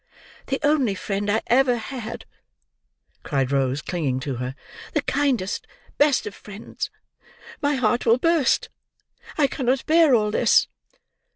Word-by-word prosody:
"The 270 - -1
only 280 -8 +2
friend 200 +2 -3
I 220 +2 +1
ever 250 0 +3
had," 235 -1 -7 1.0
cried 135 -3 -1
Rose, 135 0 0
clinging 145 -8 -2
to 135 -3 -4
her. 125 +2 -4 0.4
"The 300 - +1
kindest, 260 -8 -1 0.3
best 290 -2 +3
of 210 - -5
friends. 205 +2 -7 0.7
My 290 -1 +1
heart 240 -1 0
will 230 +1 +5
burst. 330 -1 +2 0.7
I 300 - +4
cannot 260 -1 -1
bear 320 -4 +5
all 210 -2 +1
this." - - +4
235 Hz, 130 wpm, -23 LUFS, 185-275 Hz, 1.0 s, will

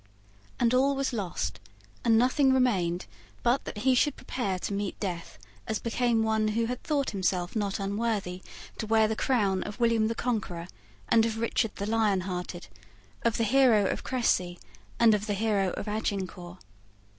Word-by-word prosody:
And 240 0 +3
all 275 +2 +3
was 270 -1 -1
lost; 155 - -3 0.4
and 225 -1 +4
nothing 260 +3 +4
remained 190 -10 +1 0.4
but 245 +3 +2
that - - -6
he 260 - +5
should 285 +4 +2
prepare 205 -7 -3
to 190 - -4
meet 200 -1 -3
death 175 -4 -5 0.3
as 220 - 0
became 230 +1 +1
one 220 -1 +1
who 225 +2 0
had 250 +2 -4
thought 285 -3 0
himself 185 -2 -1
not 205 -2 -1
unworthy 200 -2 -2 0.4
to 220 - -3
wear 220 0 +4
the 220 - -1
crown 205 -7 +1
of 205 - -6
William 230 -2 +3
the 230 - -2
Conqueror 195 -9 -2 0.4
and 225 -1 +5
of 225 -1 -1
Richard 225 -1 0
the 200 - -4
Lionhearted, 190 -5 -1 0.6
of 230 -1 +1
the 230 - +1
hero 235 -3 +4
of - - -2
Cressy 185 -8 0 0.4
and 230 -2 +6
of 210 +1 -1
the 205 - 0
hero 200 -2 +1
of - - -5
Agincourt. 190 -4 -3
220 Hz, 170 wpm, -28 LUFS, 195-235 Hz, 0.6 s, and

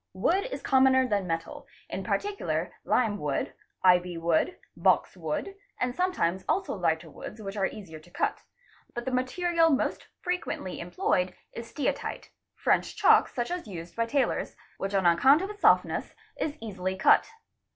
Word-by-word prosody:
Wood 345 - +1
— - - -19
is - - -5
commoner 260 -1 +4
than 200 -5 0
metal, 165 0 -4 0.2
in - - -4
particular 405 0 -2
lime 220 -5 +1
wood, 145 -4 -2 0.3
ivy 180 -1 +4
wood, 165 - +1 0.2
box - - +2
wood, 395 - -3 0.3
and 250 -1 0
sometimes 190 - 0
also 385 - 0
lhghter 165 -4 0
woods 215 - -9
which 200 -1 -6
are 195 -2 +1
easier 170 -7 -9
to 155 - -19
cut; - - -1 0.5
but 240 0 -4
the 260 - -2
material 330 +7 +2
most 275 - 0
frequently 360 - -3
employed 180 +1 0 0.2
is 230 0 -8
steatite 295 - -3 0.3
(french - - +1
chalk - - +5
such 240 +4 -3
as 355 -8 -4
used 170 -3 -8
by 230 0 0
tailors), 270 +3 0 0.2
which 195 +1 -2
on 190 -2 +2
account. 265 - +5
of 395 - -4
its 415 -1 -13
softness - - +3 0.2
is 305 0 -3
easily 190 -4 -3
cut. 190 - +4
215 Hz, 160 wpm, -28 LUFS, 180-290 Hz, 0.5 s, chalk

